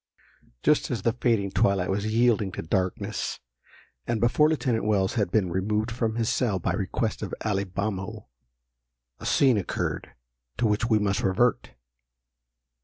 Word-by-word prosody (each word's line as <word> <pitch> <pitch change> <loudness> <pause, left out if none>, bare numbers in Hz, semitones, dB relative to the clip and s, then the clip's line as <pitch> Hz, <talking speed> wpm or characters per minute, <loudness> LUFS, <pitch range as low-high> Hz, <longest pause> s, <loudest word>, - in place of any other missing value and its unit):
_ - - -43
JUST 150 - +3
as 115 -6 -3
the 115 - +2
fading 115 -5 +1
twilight 95 -1 +2
was 100 +2 -1
yielding 115 -4 +2
to - - -5
darkness, 95 +2 -2 0.7
and 115 -1 0
before 120 +7 +4
Lieutenant 130 -7 0
Wells 105 +1 +1
had 105 -7 0
been 95 -3 +1
removed 105 +5 -1
from 115 -1 -1
his 115 -1 0
cell 110 -6 +1
by 90 - -1
request - - -2
of - - -4
Alibamo, 100 +1 -2 0.9
a - - -5
scene 130 -5 +4
occurred 95 - -3 0.5
to 120 - +1
which 110 +2 +1
we 110 - +4
must 100 -2 0
revert. 105 +6 +1
105 Hz, 150 wpm, -26 LUFS, 95-115 Hz, 0.9 s, before